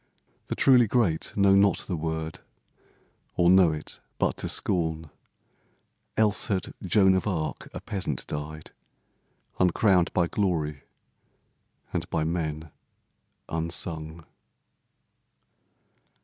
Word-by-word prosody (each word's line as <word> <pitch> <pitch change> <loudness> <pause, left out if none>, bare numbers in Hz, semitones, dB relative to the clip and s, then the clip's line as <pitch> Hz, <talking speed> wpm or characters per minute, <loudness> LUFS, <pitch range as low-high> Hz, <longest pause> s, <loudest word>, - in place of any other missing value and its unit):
The - - -3
truly 125 -4 +5
great 100 -9 +1
Know 100 -1 +5
not 100 0 +3
the 90 - -3
word, 80 0 -4 1.0
or 85 0 +4
know 95 -3 +6
it 75 0 -5 0.2
but - - 0
to - - -2
scorn, 80 -3 -1 1.1
Else 105 -2 +3
had 95 -4 -2
Joan 95 0 +4
of 95 +2 0
Arc 80 -6 -3
a - - -7
peasant 90 - -4
died, 75 +1 -6 0.9
Uncrowned 90 0 +3
by 85 - +2
glory 80 -7 -1 1.1
and - - -3
by 80 - 0
men 80 -1 -3 0.8
unsung. 80 -1 -3
85 Hz, 105 wpm, -26 LUFS, 80-95 Hz, 1.1 s, know